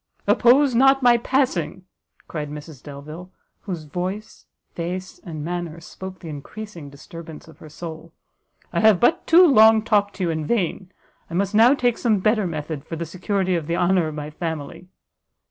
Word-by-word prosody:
"Oppose 260 +3 +4
not 270 +2 +4
my 240 -1 +6
passing!" 230 - -1 0.4
cried 150 -3 -5
Mrs 150 -2 -9
Delvile, 155 +5 -10 0.3
whose 175 -6 -6
voice, 185 +7 -6 0.3
face 180 +2 -5
and 155 -4 -7
manner 175 -2 -4
spoke 190 +2 -9
the 175 - -11
encreasing 160 +2 -8
disturbance 160 +2 -11
of 160 - -16
her 155 - -12
soul; 165 +1 -9 0.6
"I - - +1
have 215 -4 +5
but 330 +9 +2
too 350 +2 +7
long 220 -7 +6
talked 205 -2 +1
to 190 - -3
you 175 - 0
in 160 -1 -3
vain; 190 -3 -1 0.4
I 170 - -6
must 200 +2 0
now 235 +6 +6
take 245 -4 0
some 225 -4 +2
better 215 +1 +1
method 150 -3 -5
for 165 - -6
the 170 +1 -4
security 185 +3 -1
of 165 -4 -2
the 170 +1 -1
honour 180 -2 +2
of 155 - -6
my 150 0 -6
family." 165 +1 -6
180 Hz, 175 wpm, -22 LUFS, 160-215 Hz, 0.6 s, too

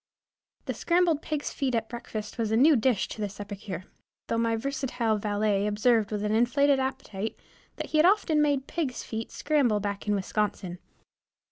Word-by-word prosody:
The - - -2
scrambled 340 -3 +2
pigs' 300 -2 -3
feet 265 -4 -1
at 225 -1 -1
breakfast 220 -2 -6
was 225 -2 0
a 220 - +2
new 295 +5 +6
dish 230 -4 +2
to 215 - -6
this 205 0 -4
epicure, 200 -3 -6 0.5
though 230 - +1
my 230 0 +2
versatile 240 -3 -1
valet 205 -1 +1
observed 215 0 +2
with 210 -1 -2
an 210 - 0
inflated 275 +5 +3
appetite, 260 -6 -3 0.4
that - - -6
he 310 - +3
had 310 - +6
often 365 -6 +3
made 285 -3 +2
pigs' 285 -7 -3
feet 225 0 -5
scramble 280 -8 +2
back 200 0 -4
in 205 - +2
Wisconsin. 195 -2 -2
225 Hz, 170 wpm, -28 LUFS, 210-275 Hz, 0.5 s, new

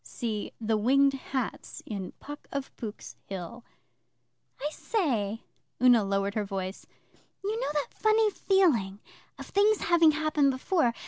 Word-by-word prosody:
[See 220 -3 -4
'The 220 -1 +1
Winged 275 +5 +4
Hats' 265 -2 -4
in 195 -4 -5
PUCK 290 0 -10
OF 280 -1 -5
POOK'S 215 -4 -7
HILL.] 195 +5 -7 1.0
I 295 +2 -2
say,' 230 - -1 0.4
Una 245 -3 +6
lowered 195 0 0
her 215 - 0
voice 195 -1 -5 0.6
'you 430 +3 -1
know - - -1
that 295 -2 -2
funny 435 0 +3
feeling 280 - +2 0.4
of - - -8
things 415 +2 +3
having 335 -2 +5
happened 305 -2 +2
before. 260 -2 +1
260 Hz, 135 wpm, -28 LUFS, 210-315 Hz, 1.0 s, Una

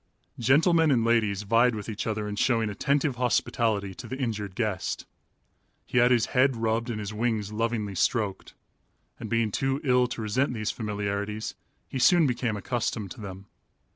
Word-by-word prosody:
Gentlemen 160 - +4
and 120 -5 +3
ladies 110 -4 +2
vied 115 +3 +3
with 105 -2 -6
each 110 -1 -4
other 105 -1 -2
in 105 - -4
showing 115 -1 +1
attentive 140 +4 0
hospitality 110 -5 0
to 120 +2 -9
the 130 - -5
injured 105 -7 -3
guest. 105 -5 -2 0.8
He 125 - +1
had 120 0 +5
his 120 -3 +3
head 130 +1 +4
rubbed 115 +1 -1
and 110 -3 -3
his 105 0 -5
wings 110 -2 -1
lovingly 110 -2 -1
stroked, 100 +1 -1 0.6
and - - -6
being 115 -2 +1
too 135 +5 0
ill 125 -2 +3
to 115 -2 -5
resent 125 +5 0
these 110 -1 -1
familiarities, 105 0 -3 0.3
he 130 - -4
soon 175 +5 +5
became 120 -4 -1
accustomed 110 -1 -2
to 120 - -9
them. 95 -1 -8
115 Hz, 170 wpm, -27 LUFS, 105-125 Hz, 0.8 s, had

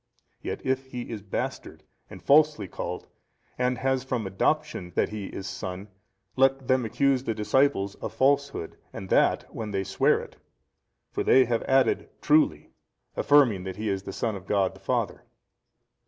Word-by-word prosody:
Yet - - -5
if 130 0 0
he 125 -2 -6
is 110 -3 -5
bastard 95 - -5 0.3
and - - -11
falsely 150 -8 +4
called 90 0 -5 0.5
and 125 0 0
has 130 -1 0
from 125 -4 -2
adoption 95 - -1
that - - +2
he 105 -2 -5
is 95 - -7
son, 95 +2 -6 0.5
let 135 0 +2
them 130 -2 +2
accuse 130 +3 +1
the 115 -4 -2
disciples 105 -2 +1
of - - -6
falsehood, 140 -8 0
and 95 - -8
that - - +3
when 110 -1 -5
they 95 -1 -1
sware - - +2
it. - - -11 0.7
For - - -2
they 130 0 +5
have 115 -1 0
added 130 -3 +2
Truly, 145 - +2 0.4
affirming 125 -10 +4
that 95 -1 -5
He 105 +1 -3
is 95 -1 -1
the 95 - -7
Son 110 +2 -2
of 95 -1 -10
God 100 -2 +1
the - - -15
Father. - - -2
115 Hz, 165 wpm, -26 LUFS, 95-135 Hz, 0.7 s, they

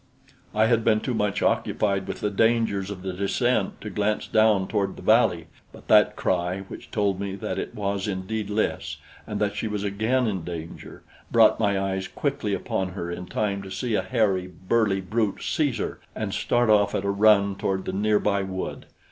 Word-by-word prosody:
I 110 +1 +4
had 115 0 +2
been 110 -1 +3
too 125 - -3
much 105 -2 0
occupied 100 -2 +1
with - - -5
the 105 - 0
dangers 110 -2 +1
of 95 -2 -7
the 95 -1 -3
descent 100 +3 0
to 105 - -6
glance 105 +2 0
down 110 -3 +3
toward 100 -1 -1
the - - -11
valley; - - +3 0.3
but - - -15
that 105 0 +6
cry 90 +1 -1
which 95 - -10
told 100 -4 0
me 100 -1 -3
that 95 -1 -4
it - - -5
was 100 -1 -2
indeed 100 +2 -3
Lys, 105 +1 -1 0.3
and 105 - -3
that 105 -1 0
she 110 - -2
was 105 -1 -3
again 110 +6 +1
in 95 -6 -2
danger, 85 -1 -8 0.3
brought 115 -2 +5
my 100 -3 +2
eyes 95 -1 -2
quickly - - -2
upon 95 -2 -3
her 85 -2 -4
in 90 +1 -6
time 100 -1 -1
to 95 - -9
see 115 +4 -3
a - - +2
hairy, 100 -7 +1
burly 95 +3 0
brute 105 +2 -1
seize 145 -7 0
her - - -4 0.2
and - - -3
start 120 -2 +2
off 105 -1 +3
at 100 - -1
a 100 - +1
run 100 -1 +4
toward 95 -1 -2
the 95 - -3
near 105 +2 +2
by 100 -1 +1
wood. 95 -1 -5
100 Hz, 200 wpm, -25 LUFS, 95-110 Hz, 0.3 s, that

